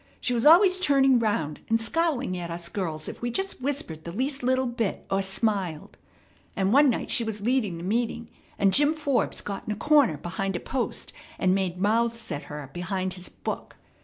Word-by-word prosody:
She 250 - 0
was 235 +3 +2
always 370 +3 +7
turning 270 -6 +4
round 160 -10 -1
and 225 0 +3
scowling 270 - 0
at 175 -1 -5
us 170 0 -5
girls 160 -6 -3
if - - -7
we 240 - -1
just 385 +5 -3
whispered 255 - -3
the 170 - -6
least 270 - -2
little 260 +1 +1
bit, 235 -4 -2
or 195 0 +2
smiled; 190 -4 0 0.6
and 195 +1 +1
one 285 +1 +6
night 235 - -2
she 235 - +2
was 220 -2 -4
leading 220 -6 0
the 165 - -8
meeting, 230 +3 -1 0.3
and 195 -1 +3
Jim 290 +2 +3
Forbes 280 -7 0
got 200 -1 -6
in - - -1
a - - -1
corner 285 - +3
behind 190 +4 -3
a - - -1
post, 260 -2 -3 0.2
and 185 -1 +2
made 190 -2 -1
mouths 230 +2 0
at 145 -1 -4
her 150 -1 -7
behind 185 +1 -2
his 180 -1 -6
book. - - -6
220 Hz, 195 wpm, -26 LUFS, 185-260 Hz, 0.6 s, always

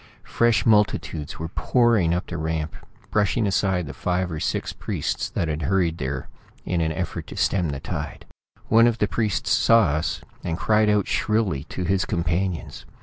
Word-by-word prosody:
Fresh 120 -1 +2
multitudes 105 -8 +1
were 80 - -4
pouring 115 -4 +2
up 90 +1 0
the 85 - -6
ramp, 80 -1 -2 0.4
brushing 105 +2 +2
aside 95 -2 +1
the 70 - -7
five 90 +4 -1
or 80 - -4
six - - -2
priests - - -3
that 85 - -2
had 75 0 -2
hurried 85 +1 +1
there 65 -1 -3 0.4
in 90 -2 0
an 80 -1 0
effort 85 0 -4
to - - -9
stem 90 -5 +1
the 70 -1 -4
tide. - - -5 0.4
One 115 +1 +6
of 120 -1 +1
the 105 - +1
priests 105 +2 -1
saw 115 -6 +5
us, 75 +3 -1 0.2
and 85 -1 -2
cried 105 +1 +3
out 105 -2 +2
shrilly 105 -10 0
to 90 - -5
his 95 +2 +1
companions. 85 +2 -2
90 Hz, 175 wpm, -24 LUFS, 80-105 Hz, 0.4 s, One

